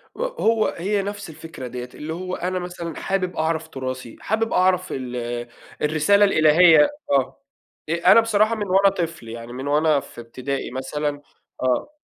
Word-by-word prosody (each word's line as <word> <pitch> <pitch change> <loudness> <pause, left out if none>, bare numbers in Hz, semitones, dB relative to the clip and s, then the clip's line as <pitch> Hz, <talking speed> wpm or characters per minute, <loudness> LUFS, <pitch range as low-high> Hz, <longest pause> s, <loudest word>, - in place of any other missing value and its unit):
وهو 470 - +1
هي 200 +4 0
نفس 205 -2 -6
الفكرة 160 -4 -9
ديّة، 125 0 -6
اللي 155 +2 -5
هو 185 +1 -4
أنا 185 +1 -2
مثلًا 175 -2 -6
حابب 185 -2 -2
أعرف 160 0 -1
تُراثي 130 -4 -6
حابب 225 +1 -1
أعرف 185 0 +2
ال 125 -2 -5 0.7
الرسالة 155 +7 +4
الإلهية. 160 -2 +6 0.2
آه. 135 -1 +1 0.5
أ 170 +1 +4
أنا 230 - +8
بصراحة 220 0 +2
من 210 -2 -3
وأنا 195 +1 +5
طفل، 165 -9 -4
يعني 115 +1 -8
من 130 +2 -5
وأنا 150 0 +3
في 120 - -11
ابتدائي 130 +4 -5
مثلًا 145 +3 -3 0.4
آه. 130 - 0
160 Hz, 155 wpm, -22 LUFS, 135-195 Hz, 0.7 s, أنا